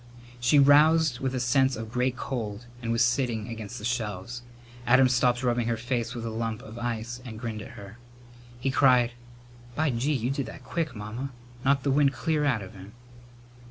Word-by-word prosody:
She 120 +5 +4
roused 145 -1 +5
with 130 -1 -2
a - - 0
sense 130 +1 +2
of 110 0 -7
great 125 +1 0
cold 115 -4 -4 0.2
and 115 -1 -2
was 115 0 +4
sitting 120 -3 0
against 115 0 -6
the 105 - -6
shelves. 115 -1 -3 0.5
Adam 130 +2 +6
stopped 125 0 +2
rubbing 120 -2 +1
her 115 -1 0
face 120 0 -2
with 115 -1 -5
a 115 - -3
lump 110 -1 -3
of 110 +2 -9
ice 120 +1 -4
and 115 -4 -8
grinned 110 -2 -4
at - - -10
her. 100 +3 -11 0.6
He 135 +2 0
cried, 125 -3 +4 0.6
"By 155 -1 +1
gee, 130 +6 0
you 125 -1 -1
did 140 -1 -2
that - - -10
quick, 160 -7 -3
Mamma! 110 +6 -5 0.3
Knocked 135 0 +2
the 140 - +1
wind 140 0 +3
clear 150 +4 0
out 120 -8 +1
of 95 - -10
him." 100 +2 -12
120 Hz, 195 wpm, -27 LUFS, 115-135 Hz, 0.6 s, Adam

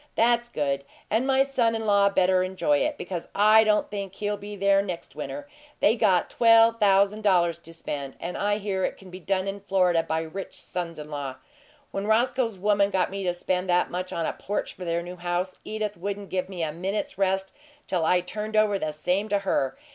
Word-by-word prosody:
"That's 240 +1 +2
good, 140 -7 -1 0.3
and 230 +5 +1
my 270 0 +4
son 240 -4 +1
in 225 0 -3
law 200 -1 +4
better 185 -1 +3
enjoy 190 +11 +1
it, 295 0 -1
because 175 -3 -5
I 215 +2 +6
don't 210 -1 +1
think 200 -2 -5
he'll 210 0 -2
be 205 +1 -8
there 200 0 +3
next 180 -7 -6
winter. 280 - -6 0.3
They 220 - +4
got 195 -6 +3
twelve 230 0 +5
thousand 200 +1 +3
dollars 175 -5 +2
to 165 -1 -13
spend, 140 -4 -5
and 175 +1 -5
I 205 0 0
hear 195 -2 -2
it - - -1
can 190 -2 -14
be 185 - -8
done 190 +1 -1
in 195 +1 -4
Florida 180 -4 +2
by 160 0 -2
rich 175 +4 -7
sons 175 -2 -3
in 150 0 -9
law. 140 -3 -4 0.6
When 195 +1 -3
Roscoe's 235 0 +1
woman 200 +1 +2
got 190 -2 0
me 195 0 -4
to 180 - +2
spend 180 +1 -2
that 180 0 +2
much 180 +1 -4
on 165 - -2
a - - -1
porch 205 - -4
for 180 - -8
their 170 0 -1
new 180 +1 -8
house, 175 +1 -2
Edith 215 -1 -3
wouldn't 200 +2 -5
give 185 0 -2
me 180 -3 -4
a 155 - -1
minute's 190 +4 -3
rest 190 0 0 0.3
till 180 -3 -1
I 180 +2 +3
turned 210 +4 -5
over 215 -2 +3
the 155 -3 -2
same 180 +7 -1
to 205 - +2
her. 135 -9 -1
195 Hz, 215 wpm, -26 LUFS, 180-210 Hz, 0.6 s, I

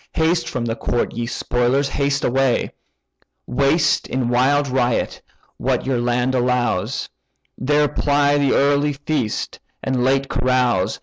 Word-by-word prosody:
Haste 165 +2 +1
from 120 -2 -3
the 115 -1 -2
court, 120 - -2
ye 120 0 -3
spoilers, 125 +3 0
haste 140 -1 -1
away: 130 0 +1 0.7
Waste 140 +3 +1
in 130 -2 -1
wild 135 +4 +2
riot 125 -2 -1 0.4
what - - -1
your 130 -2 0
land 120 +2 0
allows, 125 -6 0 0.5
There 145 +3 +2
ply 145 0 +1
the 140 -2 +2
early 145 +1 +2
feast, 140 -5 -3 0.2
and 130 -2 0
late 135 +1 +2
carouse. 125 -6 0
130 Hz, 130 wpm, -20 LUFS, 125-140 Hz, 0.7 s, wild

